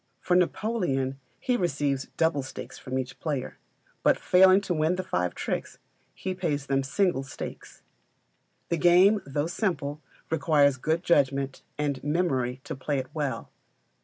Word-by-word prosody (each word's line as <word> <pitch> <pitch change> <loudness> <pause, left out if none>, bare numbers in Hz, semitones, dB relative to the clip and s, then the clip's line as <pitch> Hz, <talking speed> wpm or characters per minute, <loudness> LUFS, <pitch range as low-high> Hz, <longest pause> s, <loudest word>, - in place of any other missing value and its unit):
For 180 - +1
Napoleon 175 - 0 0.2
he 250 - 0
receives 145 - 0
double 160 -3 +2
stakes 130 - -8
from 130 0 -4
each 130 -1 -4
player; 145 -5 -3 0.4
but - - +4
failing 190 +1 +6
to 195 - -2
win 160 +2 +1
the 185 - -3
five 90 - -1
tricks, - - -3 0.4
he 190 - -3
pays 155 -6 -2
them 135 0 +1
single 155 +3 +1
stakes. 135 -2 -9 0.9
The 170 - +1
game, 185 +5 +5
though 145 +2 -1
simple, 155 -5 -2 0.3
requires 145 -3 +3
good 160 +6 0
judgment 140 -4 +1 0.2
and 145 -3 -2
memory 135 -6 0
to - - -5
play 140 +2 -2
it 130 -1 -3
well. 140 -7 -3
150 Hz, 145 wpm, -27 LUFS, 135-175 Hz, 0.9 s, failing